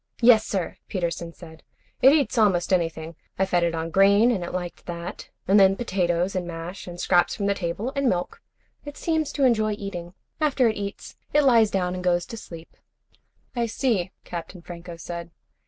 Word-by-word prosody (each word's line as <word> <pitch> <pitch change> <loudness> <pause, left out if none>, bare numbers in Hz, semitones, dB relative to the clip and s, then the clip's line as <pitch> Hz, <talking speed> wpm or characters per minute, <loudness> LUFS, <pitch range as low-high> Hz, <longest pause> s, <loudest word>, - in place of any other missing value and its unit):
"Yes, 230 -2 +6
sir," 190 -4 -2
Peterson 170 -2 -3
said. 160 -2 -13 0.4
"It 265 - +8
eats 290 -3 +2
almost 195 -5 +3
anything. 165 -2 -1 0.2
I 190 - +2
fed 175 -2 +1
it 170 -1 0
on 165 0 -3
grain 200 +5 +5
and 195 -7 -1
it 175 - -5
liked 175 -1 -5
that. 170 0 -6 0.2
And 200 +2 +6
then 195 0 +6
potatoes, 185 -4 0
and 180 -2 -2
mash, 170 +3 -7
and 175 0 -8
scraps 175 -1 +3
from 200 - -3
the 200 - +2
table, 195 +7 -3
and 275 -2 +2
milk. 180 -3 -2 0.4
It 290 0 -9
seems 315 -3 0
to 280 - 0
enjoy 215 -4 +3
eating. 180 -3 -7 0.2
After 280 -5 +3
it 220 - 0
eats 200 0 -6 0.2
it 295 0 +5
lies 230 -5 +5
down 180 -2 -1
and 180 0 -5
goes 175 -1 +2
to 230 - -8
sleep." 165 -6 -11 0.8
"I 235 -1 0
see," 220 -6 0 0.2
Captain 170 +1 -7
Franco 170 -1 -9
said. 170 0 -7
185 Hz, 190 wpm, -25 LUFS, 175-220 Hz, 0.8 s, It